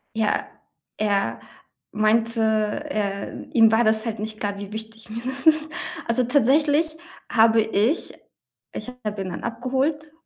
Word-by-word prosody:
Ja, 220 -2 0 0.5
er 205 -2 0 0.5
meinte, 225 +2 +2
er 215 -1 -1
ihm 225 -2 +6
war 225 +2 +4
das 220 0 +3
halt 225 -2 -3
nicht 215 0 -5
klar, 205 -1 -2
wie 205 +1 -8
wichtig 220 0 -8
mir 225 +2 -5
das 265 +2 -4
ist. 315 -1 +4 0.4
Also, 235 +2 +2
tatsächlich 290 +5 +3 0.3
habe 225 -1 +5
ich 220 - +1 0.6
ich 215 - -5 0.2
habe 210 -1 -3
ihn 185 - -5
dann 175 - -6
abgeholt, 265 +6 -2
225 Hz, 140 wpm, -23 LUFS, 215-265 Hz, 0.6 s, ihm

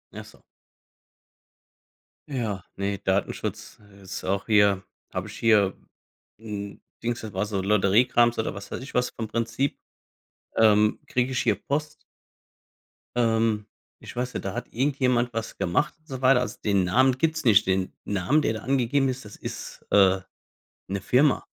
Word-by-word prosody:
Ach - - -7
so. - - -18 1.9
Ja. 110 -9 -3
Ne, 100 0 -2
Datenschutz, 95 +1 -2
äh, 100 -1 -19
ist 95 -1 -7
auch 95 +1 -1
hier. 100 -3 +4 0.3
Habe 90 +2 -3
ich 105 - -9
hier 105 -5 +4 0.7
'n 100 -2 -7 0.2
Dings 120 0 -1
das 110 -3 -7
war 95 +2 0
so 100 -2 -2
Lotteriekrams 105 +4 +3
oder 110 - -1
was 100 - -9
weiß - - -4
ich 135 - -9
was 125 0 +1
vom 110 - -5
Prinzip. 115 +5 -1 0.8
Ähm, 105 -1 +4
kriege 125 +1 0
ich 125 - 0
hier 110 -4 +2
Post 150 +8 -3 1.2
Ähm, 115 -2 +2 0.3
ich - - -11
weiß 125 +1 -2
nicht. - - -5
Da 95 - -2
hat 120 +1 -5
irgendjemand 125 -2 +1
was 115 0 -4
gemacht 90 +12 0
und 155 - -36
so 130 -4 -6
weiter. 130 -1 +5
Also, 125 - -4
den 100 -3 +2
Namen 130 +8 +3
gibt's 160 +1 0
nicht. 110 -3 +6
Den 95 0 0
Namen, 105 - +1
der 110 - 0
da 110 - -4
angegeben 135 +1 +1
ist, 130 -2 -5
das 105 - -10
ist, - - -8
äh, 95 -2 +5 0.7
'ne 100 +1 -3
Firma. 130 +8 +3
110 Hz, 160 wpm, -26 LUFS, 100-125 Hz, 1.9 s, nicht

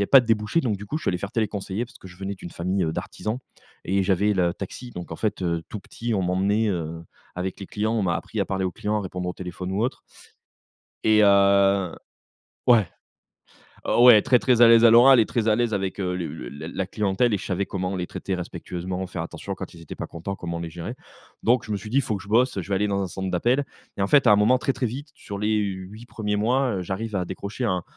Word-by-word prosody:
avait - - 0
pas 135 - +8
de 120 - -8
débouchés, 110 +6 +1
donc 115 -9 -1
du 105 +2 -9
coup 150 - -2
je - - -13
suis - - 0
allé 90 - 0
faire 100 +3 -6
téléconseiller, 105 -1 -2
parce 125 +3 -17
que 95 - -12
je 90 - -14
venais 95 +1 -4
d'une 90 -2 -10
famille, 90 +2 -1
heu, 80 - -1
d'artisans 110 +7 -4 0.5
et 95 +1 +1
j'avais 100 +2 +2
le 90 -2 +2
taxi, 110 +6 -7
donc 90 -6 -8
en - - -5
fait, 105 -1 -2
heu, 85 -2 -1
tout 105 - -6
petit 115 +3 -4
on 95 - 0
m'emmenait, 100 +5 +1
heu, 85 -3 -3 0.3
avec 90 +1 -4
les 95 - -6
clients, 110 +3 -1
on 110 - +1
m'a 90 -3 +1
appris - - -5
à - - +2
parler 95 -1 -2
aux 90 - -1
clients, 105 +4 -1
à - - -2
répondre 90 -1 -4
au - - -2
téléphone 90 +1 -6
ou 100 +3 0
autre. 125 - -2 1.0
Et 110 -1 +5
heu, 100 -2 +4 0.7
ouais. 115 -5 +6 1.0
Oh 120 - +4
ouais 115 -4 +9
très 125 +3 +4
très 125 -2 +3
à 120 - +10
l'aise 115 0 +7
à 115 - +9
l'oral 125 +3 +8
et - - +2
très 115 -1 -1
à 110 - +4
l'aise 120 -1 0
avec, 95 -1 -2
heu, 90 -1 -1
le 85 -3 -3
le 75 -5 -7 0.2
la 95 +3 -3
clientèle 105 +3 +1
et - - +2
je - - -8
savais 100 +1 -1
comment 95 0 -3
les 90 -1 -2
traiter 95 - -4
respectueusement, 90 +1 -5
faire 95 - -5
attention, - - -6
quand - - -8
ils 85 - -13
étaient 85 - -9
pas - - -5
contents, 85 +4 -6
comment 85 -2 -5
les 85 -1 -5
gérer. 85 +9 -6 0.5
Donc 120 +1 +3
je 110 - -6
me 105 - 0
suis 105 +2 -9
dit: 125 - 0
«Il - - +5
faut 110 -5 -2
que 95 - -11
je - - -15
bosse, 120 +2 +2
heu, - - 0
je 85 - -10
vais 100 - +1
aller 105 +2 +1
dans 100 -1 0
un 95 - -2
centre 95 +2 -4
d'appels» 120 +10 +1 0.3
et - - -2
en 100 - +2
fait 145 +3 +5
à - - +8
un - - +8
moment 105 +5 +4
très, 135 +1 -1
très 125 - -1
vite 140 +6 -7
sur 100 - -7
les 105 +1 +1
8 100 +2 -4
1ers 110 -3 -3
mois, 125 +5 +1
heu, - - -3
j'arrive 100 +4 -4
à 95 - 0
décrocher 100 +7 -6
un 90 -5 0
100 Hz, 265 wpm, -24 LUFS, 95-115 Hz, 1.0 s, à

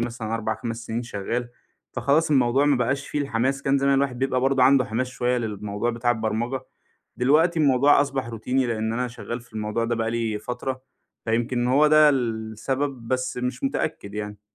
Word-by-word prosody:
مثلًا 115 -2 -3
4 115 -1 -1
5 115 -2 -6
سنين 115 +2 -3
شغّال. 120 +2 -3 0.4
فخلاص 155 +3 +1
الموضوع 130 0 +3
ما 145 -1 +3
بقاش 130 +3 -1
فيه 150 - -2
الحماس. 135 0 -1
كان 135 0 +2
زمان 140 0 +3
الواحد 135 -3 0
بيبقى 130 -1 0
برضو 135 0 +2
عنده 135 0 +5
حماس 125 +2 -2
شويّة 125 0 -1
للموضوع 105 0 -3
بتاع 120 +1 0
البرمجة، 115 +3 -1 0.6
دلوقتي 160 +7 +3
الموضوع 140 0 +5
أصبح 135 -4 -1
روتيني 125 +3 -1
لأن 110 -1 -1
أنا 125 +2 -1
شغّال 120 0 -6
في 120 0 -21
الموضوع 110 +1 -2
ده 120 +1 0
بقى 115 0 -1
لي 115 -2 -1
فترة، 125 +4 -5 0.4
فيمكن 120 +2 0
هو 140 +4 +4
ده 155 0 +6
السبب 120 +1 -2
بس 130 -1 -1
مش 125 - -3
متأكّد 155 - -2
يعني. 105 -1 -5
125 Hz, 175 wpm, -24 LUFS, 115-135 Hz, 0.6 s, ده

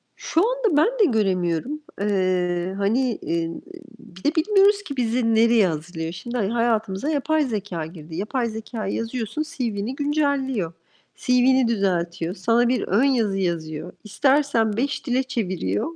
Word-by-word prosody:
Şu 330 - 0
anda 465 -11 +1
ben 310 - +5
de 415 - +6
göremiyorum. 185 - 0 0.2
Eee, 185 -2 0
hani, 230 +4 +1
inn, 165 0 -2 0.4
bir 185 +2 -15
de 300 +4 +1
bilmiyoruz 400 +4 +4
ki 280 -7 -7
bizi 230 -1 +1
nereye 225 -3 +5
hazırlıyor. 160 +1 -4
Şimdi, 240 +8 -5
ha 210 -1 0
hayatımıza 225 +1 0
yapay 310 +1 +1
zekâ 200 -9 -3
girdi. 160 -1 -10
Yapay 230 +6 -1
zekâya 220 -1 -5
yazıyorsun, 230 +4 -3
CV'ni 240 -6 -3
güncelliyor, 280 - 0 0.4
CV'ni 250 0 +3
düzeltiyor, 175 -5 -1
sana 230 +5 +2
bir 250 +1 +1
ön 205 +7 +3
yazı 230 -8 +2
yazıyor, 165 -3 -3
istersen 250 -2 +2
5 280 +4 -1
dile 255 +1 +2
çeviriyor. 185 - -2
225 Hz, 140 wpm, -23 LUFS, 185-265 Hz, 0.4 s, de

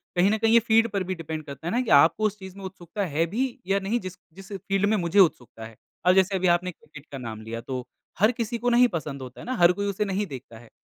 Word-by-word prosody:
कहीं 180 +2 +4
न 220 - +1
कहीं 225 +1 +2
ये 235 - +8
फ़ील्ड 225 0 +3
पर 200 -1 -1
भी 185 +1 -4
डिपेंड 160 -2 -6
करता 140 +2 -8
है - - -1
ना 245 - +2
कि 250 - -4
आपको 165 +8 +4
उस 210 -1 -1
चीज़ 190 -1 -10
में 195 - -10
उत्सुकता 190 +1 -5
है 165 0 0
भी 240 - 0 0.3
या 195 +1 +2
नहीं 200 +5 -1
जिस 185 -3 -8 0.2
जिस 195 +3 -13
फ़ील्ड 195 +1 -1
में 220 - +3
मुझे 175 +1 +1
उत्सुकता 125 - +1
है। 110 0 -12 0.3
अब 180 - +6
जैसे 190 +1 +3
अभी 185 -1 +1
आपने 175 +1 +2
क्रिकेट 150 -3 -15
का 140 - -6
नाम 110 -4 -7
लिया 115 +1 -6
तो, 125 +1 -5 0.3
हर 215 +4 +5
किसी 235 0 -3
को 245 +2 0
नहीं 245 +1 +5
पसंद 150 -4 -5
होता 130 -1 -10
है - - -10
ना 255 - -3
हर 175 -5 +5
कोई 200 +2 -3
उसे 200 +1 -1
नहीं 200 +1 -1
देखता 130 -6 -10
है। 115 -1 -17
185 Hz, 280 wpm, -25 LUFS, 155-210 Hz, 0.3 s, ये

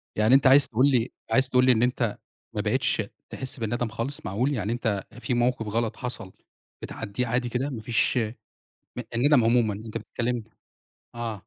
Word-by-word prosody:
يعني 110 +4 +3
أنت 135 0 +5
عايز 135 +1 +7
تقول 125 +5 +3
لي 120 -3 +1 0.2
عايز 130 +3 +4
تقول 125 0 +4
لي 130 - +6
إن 115 0 +3
أنت 120 -3 0 0.4
ما - - -1
بقيتش - - +1 0.3
تحس 130 -1 -2
بالندم 120 +2 -1
خالص؟ 120 +5 -5
معقول! 120 +9 0
يعني 110 -2 -2
أنت 110 -5 -1 0.2
في 125 - -2
موقف 120 -1 +1
غلط 115 +1 -1
حصل 125 -7 -5 0.5
بتعدِّيه 115 +3 -4
عادي 120 +1 0
كده، 130 +4 -2
ما 115 -5 -6
فيش 115 +2 +1
أ 115 0 -1 0.8
الندم 125 0 +4
عمومًا 115 -3 +3
أنت 110 +2 -6
بتتكلم 120 +1 -3 0.7
آه. 120 -1 -3
120 Hz, 175 wpm, -26 LUFS, 110-125 Hz, 0.8 s, عايز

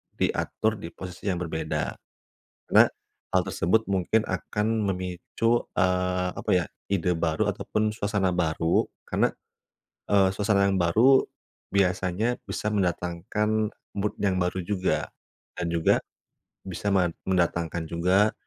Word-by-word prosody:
diatur 110 -1 0
di 85 - -6
posisi 90 +1 -8
yang 95 - +2
berbeda. 80 -2 -2 0.7
Karena - - +7 0.5
hal - - +5
tersebut 110 +7 +1
mungkin 100 +3 +2
akan 105 +3 -2 0.3
memicu, 90 +6 -1
eee, 90 -1 +1
apa - - -3
ya, 90 -1 +3 0.3
ide 90 -2 +1
baru 80 -2 +1
ataupun 110 0 -1
suasana 100 -3 0
baru. 85 -1 +1 0.2
Karena, - - +2 0.8
eee, 100 -2 +5
suasana 100 -1 +2
yang 95 - +1
baru 115 +11 +5 0.5
biasanya 95 +4 +1
bisa 105 - -3
mendatangkan 105 +3 0 0.2
mood 100 +1 0
yang 95 -2 +1
baru 90 +1 -1
juga, 95 0 0 0.5
dan 90 - -2
juga 85 -1 +3 0.7
bisa 95 +2 -3
men 90 -3 +2
mendatangkan 85 -2 0
juga 95 +5 +3
95 Hz, 120 wpm, -26 LUFS, 90-105 Hz, 0.8 s, Karena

